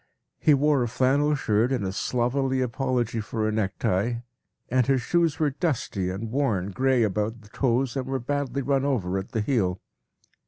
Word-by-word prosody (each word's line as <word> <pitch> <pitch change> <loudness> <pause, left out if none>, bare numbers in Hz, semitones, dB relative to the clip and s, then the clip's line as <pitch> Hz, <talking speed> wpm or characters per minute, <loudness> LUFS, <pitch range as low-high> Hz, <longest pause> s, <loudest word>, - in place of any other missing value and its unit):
He 150 - +5
wore 145 -1 +3
a 120 - +1
flannel 140 +5 +2
shirt 115 -2 +1
and 125 -7 0
a 95 - -1
slovenly 130 +5 0
apology 125 -2 -1
for 110 0 -2
a - - 0
necktie, 110 +2 0 0.5
and 130 0 +2
his 135 -1 +3
shoes 170 -4 +1
were 150 -2 +1
dusty 130 - -1
and 105 +4 -5
worn 110 -9 0
gray 130 +3 +2
about 105 +2 -1
the 105 - -17
toes 125 +2 0
and 130 -1 -2
were 135 0 -1
badly 140 +1 -2
run 135 -1 +1
over 100 -10 0
at 95 - -7
the 110 - -1
heel. 100 -7 0
125 Hz, 180 wpm, -26 LUFS, 110-135 Hz, 0.5 s, He